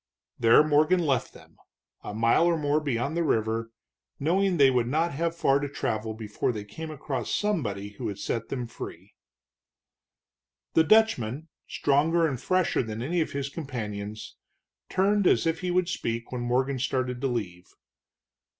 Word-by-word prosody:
There 115 +5 +6
Morgan 155 +4 +3
left 135 -4 0
them, - - -18 0.5
a - - -5
mile 115 +10 +3
or 170 -1 +2
more 145 0 +1
beyond 140 0 -2
the 170 - +1
river, 115 -4 0 0.5
knowing 180 +5 +2
they 135 -3 +6
would 125 -2 +1
not 160 +6 +1
have 165 +3 -1
far 140 -4 +3
to 145 0 -3
travel 110 -5 -3
before 110 +1 -2
they 105 -3 -5
came 155 +11 -8
across 135 -7 -4
somebody 115 - -1
who 105 - -8
would 100 - -3
set 115 +3 -3
them 125 -2 -3
free. 115 - -9 1.6
The 160 - +5
Dutchman, 160 - +2 0.2
stronger 160 +4 +2
and 135 -6 -2
fresher 185 -1 +1
than 110 -1 -5
any 170 +6 0
of 155 - -3
his 140 -1 -2
companions, 110 -8 -6 0.5
turned 200 +1 +2
as - - +3
if 165 0 0
he 180 - -3
would 180 0 +1
speak 115 -9 -3
when 125 -1 -3
Morgan 130 +2 0
started 125 -1 -1
to 135 - +1
leave. 90 -8 -4
135 Hz, 160 wpm, -27 LUFS, 115-165 Hz, 1.6 s, There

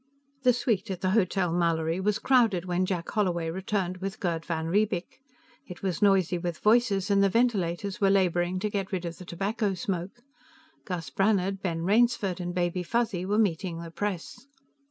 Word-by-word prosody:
The 250 -1 +5
suite 225 -4 -1
at 185 -2 -4
the 185 - +1
Hotel 190 -4 +1
Mallory 165 -1 +1
was 210 +2 +1
crowded 225 -8 +3
when 180 +1 0
Jack 175 -3 -2
Holloway 175 -6 0
returned 185 0 -2
with 195 +1 -5
Gerd 170 -3 -1
van 160 -1 -3
Riebeek; 195 +1 -1 0.5
it 180 - -10
was 185 -5 -2
noisy 190 -3 +3
with 170 -2 -3
voices, 210 -3 +2
and 200 0 +4
the 195 - +4
ventilators 200 -5 0
were 195 - +4
laboring 180 -2 +2
to 210 - 0
get 195 -2 -3
rid 185 -2 -2
of 170 -1 -6
the 180 - -9
tobacco 200 +3 -1
smoke. 185 +5 -4 0.6
Gus 170 -8 -5
Brannhard, 195 +2 +1
Ben 165 -3 -2
Rainsford 205 -2 +2
and 175 0 -4
Baby 175 0 0
Fuzzy 190 -2 -1
were 205 +2 +1
meeting 180 -4 0
the 170 -1 -8
press. 205 +7 -4
190 Hz, 175 wpm, -27 LUFS, 175-205 Hz, 0.6 s, The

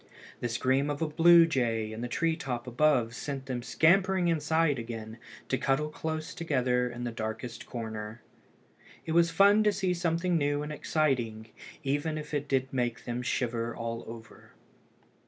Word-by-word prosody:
The 120 - -2
scream 130 +4 +1
of 145 +2 -2
a - - 0
blue 170 +2 +7
jay 115 -8 0
in 110 - -6
the 120 - -2
tree 165 +6 0
top 125 -6 -4
above 125 -2 +2
sent 135 +2 -5
them 125 -2 -3
scampering 185 +6 +3
inside 160 -3 +1
again, 115 -1 -7 0.3
to 130 - 0
cuddle 140 +3 +1
close 160 0 -4
together 125 -6 0
in 120 0 -7
the 120 - -2
darkest 115 +1 -5
corner. 110 -1 -6 0.8
It 160 - -3
was 170 +1 +4
fun 200 +5 +5
to 210 - +4
see 190 -2 0
something 170 0 0
new 145 0 0
and 150 - -5
exciting, 120 -9 -1 0.3
even 145 +3 -1
if 150 0 -7
it 145 0 -1
did 135 -1 0
make 120 -3 -2
them 120 0 -3
shiver 120 -2 -2
all 115 0 -4
over. 115 0 -12
135 Hz, 165 wpm, -29 LUFS, 120-160 Hz, 0.8 s, blue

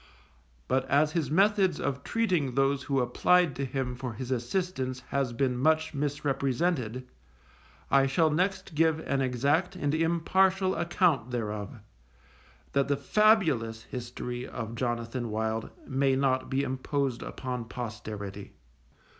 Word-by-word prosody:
But 130 0 +1
as 150 +2 +3
his 155 -5 -1
methods 195 +3 +3
of 140 -1 -2
treating 180 - 0
those 135 0 +2
who 135 -2 +1
applied 160 +5 +3
to 140 - -2
him 130 -1 -2
for 125 -1 -5
his 125 +3 -6
assistance 130 0 -2
has 135 -3 0
been 125 +1 0
much 160 +5 +2
misrepresented, 140 -2 -1 0.9
I 135 0 +5
shall 155 +4 +2
next 185 +3 -1
give 160 0 +3
an 135 -3 -1
exact 140 +9 +1
and 145 -5 -1
impartial 185 +4 +2
account 165 - +1
thereof, 105 -2 -4 0.9
that 140 -1 +2
the 140 -1 +1
fabulous 140 - +2
history 125 0 -6
of 115 -2 -6
Jonathan 120 0 -2
Wild 110 +1 -2 0.2
may 135 0 +2
not 130 -1 +1
be 135 +1 +1
imposed 130 -1 -2
upon 125 -2 -5
posterity. 105 -4 -6
135 Hz, 130 wpm, -29 LUFS, 125-160 Hz, 0.9 s, I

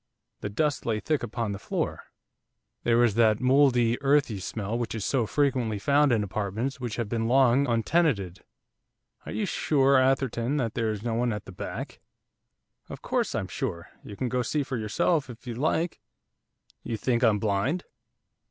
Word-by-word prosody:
The 105 - -4
dust 145 +7 0
lay 110 -2 -1
thick 155 +5 -1
upon 115 -2 -3
the 100 - -5
floor, - - -3 0.8
there 115 -1 +2
was 120 -3 +4
that 110 -1 +3
mouldy, 125 -2 +3
earthy 140 -6 +2
smell 105 +3 -4
which 120 -1 -2
is 110 - -3
so 125 -5 +1
frequently 125 -7 0
found 140 +7 +3
in 110 -3 +2
apartments 110 +6 -3
which 120 -4 -4
have 115 -3 -2
been 115 +1 -1
long 130 +2 +4
untenanted. 115 - +1 0.8
'Are - - -5
you 215 - -1
sure, 140 -6 +3
Atherton, 130 0 +1
that 115 -6 -1
there 115 -2 0
is 105 -1 -4
no 120 -1 -1
one 120 +1 +1
at 105 -1 -5
the - - -10
back?' 90 - -6 0.9
'Of - - -9
course - - -1
I'm 95 - -2
sure, 95 - -4
you 105 - -9
can 130 - -2
go 125 +1 -1
and 125 - -1
see 150 -2 0
for 130 - -4
yourself 125 +7 0
if 120 +1 -11
you 120 - -4
like; 160 +6 -1 0.8
do - - -9
you 115 - -1
think 120 +2 0
I'm 110 -3 +4
blind? 110 - 0
120 Hz, 180 wpm, -27 LUFS, 110-135 Hz, 0.9 s, was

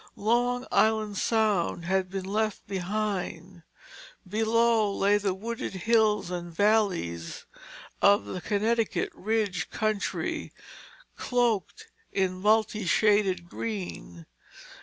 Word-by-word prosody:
Long 245 +3 +1
Island 215 -2 +2
Sound 210 -7 +1
had 190 +1 0
been 190 0 -4
left 215 +1 -1
behind. 190 -2 -3 0.7
Below 225 +1 +2
lay 200 +1 +2
the 195 -2 -1
wooded 230 +5 -5
hills 210 -1 +2
and 175 -1 -5
valleys 180 - 0 0.6
of 200 0 +5
the 185 - -5
Connecticut 220 +3 0
ridge 210 -4 -1
country, 215 -2 -2 0.6
cloaked 240 -6 0 0.3
in 185 -1 -1
multi 215 0 +2
shaded 200 -4 +2
green. 90 - -6
205 Hz, 95 wpm, -27 LUFS, 185-220 Hz, 0.7 s, of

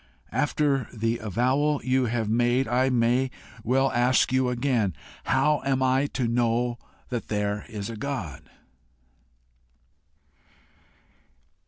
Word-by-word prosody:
After 145 -3 +1
the 115 0 -1
avowal 130 +8 +1
you 130 0 +2
have 115 -2 -1
made, 120 +4 +2
I 130 +2 +2
may 125 +1 +2 0.3
well 135 +4 +2
ask 125 +1 +2
you 130 -1 +2
again, 120 - 0 0.3
How 145 +3 +2
am 135 -1 +1
I 130 +2 +2
to 125 -3 0
know 120 0 0 0.3
that 120 -2 -4
there 105 -1 -2
is 105 -3 -5
a 115 - -6
God?" 105 - -5
125 Hz, 115 wpm, -26 LUFS, 115-130 Hz, 0.3 s, you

